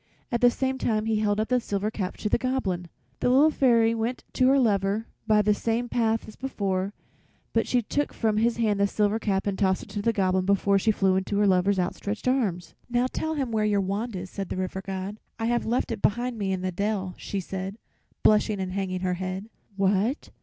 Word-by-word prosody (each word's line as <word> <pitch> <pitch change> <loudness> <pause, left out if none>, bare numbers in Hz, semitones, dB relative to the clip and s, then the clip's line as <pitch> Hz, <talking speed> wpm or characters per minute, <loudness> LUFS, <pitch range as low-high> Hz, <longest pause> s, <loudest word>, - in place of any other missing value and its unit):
At 235 - 0
the 245 - +7
same 265 +2 -1
time 215 -3 0
he 220 -1 +1
held 205 -1 +1
up 220 +3 -1
a - - +3
little 250 -2 +1
silver 205 +1 -1
cap 190 -4 -4
to - - -2
the 210 - +2
Goblin. 195 -10 -1 0.3
The - - +2
Little 280 +5 +5
Fairy 230 -5 +4
went 230 +2 -2
to 255 - +3
her 270 +1 +5
lover 205 -3 +1 0.2
by 210 -1 +4
the 210 +1 +4
same 230 +3 -1
path 225 -2 0
as 215 - -11
before, 200 -6 -2 0.6
but 225 - +1
she 245 -2 +2
took 290 +7 -1
from 215 -2 0
his 230 +2 +2
hand 215 -3 +1
the 200 - +4
little 200 - -5
silver 210 +1 +2
cap 195 -3 0
and 200 -2 -2
tossed 190 -2 +2
it - - -13
to 205 - -3
the 230 - +2
Goblin 185 -3 +1
before 200 0 +3
she 220 - +1
flew 195 -3 +3
into 190 +2 -1
her 205 - +4
lover's 190 +1 +3
outstretched 200 +5 -2
arms. 195 -10 0 0.2
"Now 245 +1 +2
tell 315 0 -2
him 270 -5 -2
where 220 -1 +1
your 210 -1 +2
wand 200 +4 -2
is," 185 0 -6
said 195 -2 -5
the - - -4
River 185 +1 -3
God. 195 +2 -5 0.2
"I 225 - -2
have 240 0 0
left 240 +1 0
it 220 -3 -4
behind 240 +3 +1
me 200 -3 -2
in 190 -1 -1
the 185 0 -1
dell," 195 0 -2
she 200 - -3
said, 190 +2 -5 0.5
blushing 210 -1 +4
and 185 -1 -3
hanging 185 -1 -2
her 185 -1 0
head. 190 +4 -4 0.2
"What! 200 +7 +1
210 Hz, 230 wpm, -26 LUFS, 190-230 Hz, 0.6 s, the